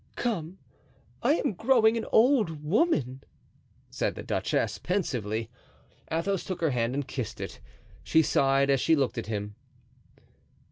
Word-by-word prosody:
"Come, 185 -7 -3 0.6
I - - +3
am 290 -7 0
growing 225 +2 +3
an 230 - -3
old 220 - +3
woman!" 150 - +1 0.7
said - - -1
the - - -7
duchess, - - -1
pensively. 115 - -2 0.6
Athos 175 +3 -1
took 185 -2 -5
her 160 -3 +2
hand 120 0 0
and 145 -1 -2
kissed 125 -5 -5
it. - - -6 0.4
She 160 - +3
sighed, 135 0 +3
as 135 -2 +2
she 165 - +4
looked 135 -4 0
at 115 - -6
him. 105 -1 -4
160 Hz, 140 wpm, -28 LUFS, 130-205 Hz, 0.7 s, she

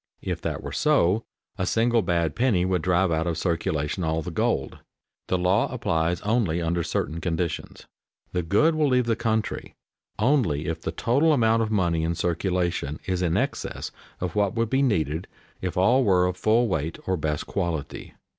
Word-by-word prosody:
If - - -3
that - - -3
were - - -5
so, 95 +7 +2 0.3
a 90 - 0
single 115 +1 +2
bad 85 -4 0
penny 115 -8 +2
would 90 -2 0
drive 90 +1 +2
out 80 +1 0
of 85 -2 -1
circulation 80 -1 -1
all 80 0 0
the - - -5
gold. - - -1 0.5
The 95 - +1
law 90 +5 +2
applies 85 -7 0
only 105 -6 +1
under 85 +1 0
certain 80 0 -2
conditions. 85 -1 -3 0.5
The 90 - 0
"good" 105 - +3
will 155 -1 +2
leave 125 -2 +2
the 115 -1 +1
country 110 -1 -2 0.4
only 110 - +2
if 80 +1 -3
the - - -3
total 145 +7 +2
amount 115 -4 +3
of 110 - 0
money 85 -6 +1
in 85 +1 0
circulation 85 -3 -1
is 90 -1 -1
in 85 -2 +1
excess - - -3 0.3
of 90 -2 -3
what 100 -1 +1
would 115 -1 0
be 135 +1 +3
needed 85 - 0 0.3
if 90 -1 -3
all 120 +8 +4
were 90 -5 +4
of 90 0 -1
full 110 +5 +2
weight 80 -5 -2
or 95 - +1
best 75 -2 -2
quality. 80 -5 -4
90 Hz, 180 wpm, -25 LUFS, 85-110 Hz, 0.5 s, all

